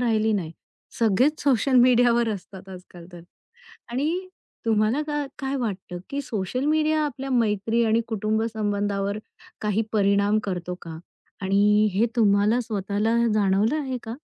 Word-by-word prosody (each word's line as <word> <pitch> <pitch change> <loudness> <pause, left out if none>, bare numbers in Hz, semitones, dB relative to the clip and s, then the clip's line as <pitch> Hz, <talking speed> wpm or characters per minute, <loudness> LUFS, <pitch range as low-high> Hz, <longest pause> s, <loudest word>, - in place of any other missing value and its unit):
राहिली 220 -2 +1
नाही. 175 -6 -2 0.5
सगळेच 240 +7 +2
सोशल 270 -1 +2
मीडियावर 240 -1 +4
असतात 195 -2 -7
आजकाल 180 -2 -12
तर. 175 - -10 0.7
आणि 320 +9 -2 0.4
तुम्हाला 220 +5 +2
काय-काय 280 -2 -3
वाटतं, 195 -7 -4
की 280 - -2
सोशल 230 +1 -3
मीडिया 310 +1 +2
आपल्या 275 -2 -5
मैत्री 225 -1 +1
आणि 225 +1 +2
कुटुंब 220 0 -1
संबंधावर 205 -1 -1 0.4
काही 210 0 0
परिणाम 200 0 +2
करतो 180 -2 -4
का? 160 -1 -8 0.4
आणि 205 +2 +3
हे 205 +5 +2
तुम्हाला 210 +1 +3
स्वतःला 210 0 -1 0.2
जाणवलं 205 +4 +2
आहे 265 -3 -3
का? 225 0 -6
220 Hz, 130 wpm, -24 LUFS, 200-250 Hz, 0.7 s, मीडियावर